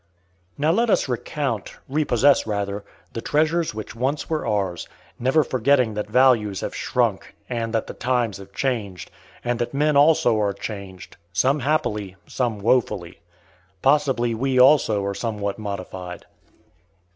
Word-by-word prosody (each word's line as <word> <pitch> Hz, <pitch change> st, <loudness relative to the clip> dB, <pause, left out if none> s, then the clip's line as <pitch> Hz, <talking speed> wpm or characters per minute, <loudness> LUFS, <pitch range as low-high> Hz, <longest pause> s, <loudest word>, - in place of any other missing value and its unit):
Now 150 Hz, +3 st, +2 dB
let 230 Hz, +6 st, +2 dB
us -, -, +2 dB
recount, 125 Hz, -2 st, -3 dB
repossess 140 Hz, -3 st, +3 dB
rather, 100 Hz, -1 st, -2 dB, 0.3 s
the 115 Hz, -, -4 dB
treasures 155 Hz, 0 st, +1 dB
which 110 Hz, 0 st, -6 dB
once 135 Hz, +5 st, -1 dB
were 155 Hz, -1 st, -2 dB
ours, 95 Hz, -5 st, -1 dB, 0.3 s
not 135 Hz, +5 st, +3 dB
forgetting 130 Hz, -2 st, +2 dB
that 105 Hz, 0 st, -4 dB
values 115 Hz, -5 st, +3 dB
have -, -, -4 dB
shrunk, -, -, -1 dB
and 115 Hz, -2 st, -3 dB
that 115 Hz, -1 st, 0 dB
the -, -, -8 dB
times 120 Hz, -4 st, -1 dB
have 100 Hz, 0 st, -12 dB
changed, 105 Hz, -8 st, -3 dB, 0.3 s
and 120 Hz, 0 st, -1 dB
that 120 Hz, +3 st, -3 dB
men 150 Hz, +1 st, +2 dB
also 140 Hz, -6 st, +4 dB
are 100 Hz, -1 st, +1 dB
changed; 100 Hz, -2 st, -8 dB, 0.2 s
some 135 Hz, +10 st, +2 dB
happily, 105 Hz, -9 st, -1 dB
some 120 Hz, -4 st, -2 dB
woefully. 100 Hz, -6 st, 0 dB, 0.6 s
Possibly 135 Hz, -4 st, +2 dB
we, 130 Hz, +3 st, 0 dB
also, 125 Hz, -7 st, +5 dB
are 100 Hz, -, -1 dB
somewhat 100 Hz, -1 st, -3 dB
modified. 95 Hz, -3 st, -6 dB
120 Hz, 140 wpm, -23 LUFS, 100-135 Hz, 0.6 s, also